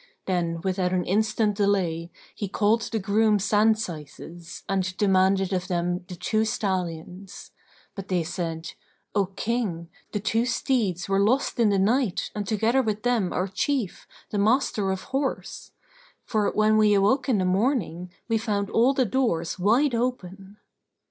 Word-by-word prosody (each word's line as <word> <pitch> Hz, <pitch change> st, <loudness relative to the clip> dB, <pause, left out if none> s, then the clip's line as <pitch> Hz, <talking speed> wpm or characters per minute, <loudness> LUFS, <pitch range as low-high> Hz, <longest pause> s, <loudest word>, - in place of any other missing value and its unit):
Then, 170 Hz, -3 st, -1 dB
without 185 Hz, -1 st, 0 dB
an 180 Hz, -2 st, 0 dB
instant 215 Hz, +1 st, +1 dB
delay, 185 Hz, -5 st, 0 dB, 0.2 s
he 205 Hz, -, -4 dB
called 210 Hz, +4 st, +2 dB
the 225 Hz, -, -3 dB
groom 210 Hz, +1 st, +2 dB
sand 210 Hz, +2 st, +3 dB
syces 165 Hz, -2 st, -8 dB
and 185 Hz, -1 st, -1 dB
demanded 195 Hz, -1 st, +2 dB
of 185 Hz, 0 st, -1 dB
them 175 Hz, -1 st, -1 dB
the 185 Hz, -, -7 dB
two 215 Hz, +5 st, 0 dB
stallions: 185 Hz, -3 st, -4 dB, 0.4 s
but 195 Hz, -1 st, -8 dB
they 180 Hz, -3 st, 0 dB
said, 165 Hz, -1 st, -4 dB, 0.4 s
"O 200 Hz, -3 st, +2 dB
King, 195 Hz, -4 st, -3 dB, 0.2 s
the 210 Hz, -, -2 dB
two 225 Hz, +4 st, 0 dB
steeds 215 Hz, -8 st, 0 dB
were 195 Hz, 0 st, +1 dB
lost 240 Hz, +6 st, +1 dB
in 225 Hz, -3 st, +4 dB
the 200 Hz, -, +2 dB
night 215 Hz, +1 st, +1 dB
and 205 Hz, -2 st, -4 dB
together 225 Hz, +5 st, +2 dB
with 215 Hz, -3 st, -2 dB
them 235 Hz, -7 st, +1 dB
our 185 Hz, -, -1 dB
chief, 230 Hz, +2 st, -2 dB, 0.2 s
the 205 Hz, -, -1 dB
Master 215 Hz, -2 st, +2 dB
of 190 Hz, 0 st, -2 dB
Horse; 270 Hz, 0 st, -3 dB, 0.5 s
for, 215 Hz, -2 st, +1 dB
when 215 Hz, 0 st, +3 dB
we 210 Hz, -1 st, +5 dB
awoke 250 Hz, +7 st, +2 dB
in 240 Hz, -, +3 dB
the 185 Hz, -, +1 dB
morning, 185 Hz, -, 0 dB, 0.2 s
we 225 Hz, -2 st, +1 dB
found 205 Hz, -3 st, -2 dB
all 250 Hz, +4 st, +3 dB
the 260 Hz, -, +2 dB
doors 215 Hz, -10 st, -1 dB
wide 240 Hz, +9 st, +3 dB
open." 205 Hz, -5 st, -3 dB
200 Hz, 155 wpm, -25 LUFS, 185-220 Hz, 0.5 s, we